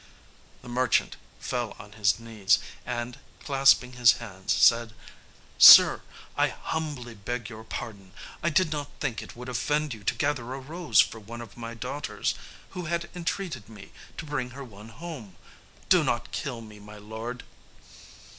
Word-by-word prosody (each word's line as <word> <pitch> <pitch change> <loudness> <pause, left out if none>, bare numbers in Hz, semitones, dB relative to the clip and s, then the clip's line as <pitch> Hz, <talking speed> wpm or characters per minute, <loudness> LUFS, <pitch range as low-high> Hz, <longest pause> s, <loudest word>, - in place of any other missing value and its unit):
The - - -12
merchant 125 0 +1 0.2
fell 120 -2 -3
on 105 - -12
his 105 0 +1
knees, 110 -4 +2 0.3
and, 120 0 -4 0.2
clasping 135 -2 +4
his 120 -2 +6
hands, 100 -6 -6
said, 115 -1 +4 0.6
"Sir, - - +10 0.3
I - - +3
humbly 145 -7 -5
beg 115 +1 -5
your 110 0 -9
pardon. 100 -4 -7 0.3
I 170 - +1
did 165 +1 +2
not 145 -2 -3
think 125 -6 -2
it - - -11
would 125 +1 -9
offend 145 +3 -1
you 110 -2 -11
to - - +1
gather 130 -4 -1
a - - -6
rose 160 +5 +3
for 110 - -3
one 115 +3 -9
of 115 -4 -10
my 115 0 -7
daughters, 125 +5 -3 0.4
who 180 -1 -6
had 170 +1 -3
entreated 170 - -4
me 105 -3 -13 0.3
to 165 - -6
bring 145 -4 -3
her 140 - -6
one 105 -3 -12
home. 115 - -9 0.5
Do 180 -3 +5
not 120 -3 -1
kill 125 -5 -4
me, 105 -2 -12
my 105 +1 -12
lord!" 110 +4 -7
120 Hz, 160 wpm, -27 LUFS, 110-145 Hz, 0.6 s, Sir